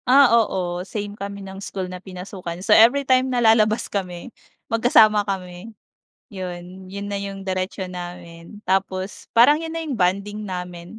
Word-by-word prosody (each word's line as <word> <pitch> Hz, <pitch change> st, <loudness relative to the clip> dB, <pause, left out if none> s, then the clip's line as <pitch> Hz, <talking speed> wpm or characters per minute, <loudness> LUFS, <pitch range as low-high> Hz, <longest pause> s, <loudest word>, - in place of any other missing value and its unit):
Ah, 265 Hz, -1 st, +6 dB
oo 185 Hz, -6 st, +1 dB
same 205 Hz, +2 st, -5 dB
kami 200 Hz, -1 st, -7 dB
ng 195 Hz, 0 st, -9 dB
school 195 Hz, -2 st, -4 dB
na 180 Hz, 0 st, -8 dB
pinasukan. 185 Hz, -2 st, -7 dB
So, -, -, +5 dB
everytime 260 Hz, +2 st, +5 dB
na 250 Hz, -, -1 dB
lalabas 220 Hz, -1 st, +4 dB
kami, 185 Hz, +2 st, -5 dB, 0.3 s
magkasama 220 Hz, -2 st, +4 dB
kami. 190 Hz, +3 st, -6 dB, 0.5 s
Yun, 185 Hz, -2 st, -8 dB
yun 200 Hz, +1 st, -6 dB
na 200 Hz, 0 st, -3 dB
yung 195 Hz, -1 st, -7 dB
diretso 185 Hz, 0 st, -3 dB
namin. 175 Hz, +1 st, -9 dB
Tapos, 190 Hz, +1 st, -2 dB
parang 290 Hz, +7 st, +5 dB
yun 325 Hz, -, -5 dB
na 330 Hz, -, -4 dB
yung 285 Hz, -, -2 dB
bonding 200 Hz, +2 st, 0 dB
namin 180 Hz, 0 st, -7 dB
195 Hz, 155 wpm, -22 LUFS, 180-220 Hz, 0.5 s, Ah